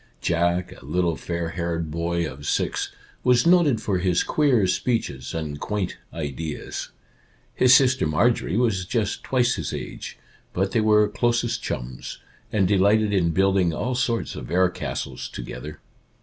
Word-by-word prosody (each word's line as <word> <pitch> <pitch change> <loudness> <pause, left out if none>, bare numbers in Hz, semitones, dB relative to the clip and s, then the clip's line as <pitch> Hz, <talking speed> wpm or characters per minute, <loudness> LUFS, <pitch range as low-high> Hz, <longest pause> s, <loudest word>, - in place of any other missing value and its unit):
Jack, 85 +1 0
a - - -15
little 85 +4 0
fair 85 0 -3
haired 85 -2 -3
boy 85 +1 -1
of 70 +1 -8
six, - - -1 0.3
was 125 +1 +4
noted 170 -8 +5
for 95 -3 -1
his 90 -1 +2
queer 135 -9 +3
speeches 90 - -1
and 75 -3 -4
quaint 105 0 -2 0.2
ideas. 75 0 -5 0.6
His 125 0 +6
sister 130 - +4
Marjorie 100 +4 +1
was 105 -7 +1
just 110 -2 -1
twice 125 -2 +2
his - - -3
age, - - -6 0.4
but 95 +2 0
they 115 - +2
were 105 -1 +4
closest 120 +2 0
chums, 60 0 -5 0.3
and 100 -4 +2
delighted 105 +2 +3
in 90 -4 +2
building 95 -1 +2
all 125 - -2
sorts 120 -2 -1
of - - -7
air 90 +2 +3
castles 65 -6 -5
together. 75 +5 -7
95 Hz, 150 wpm, -24 LUFS, 85-115 Hz, 0.6 s, His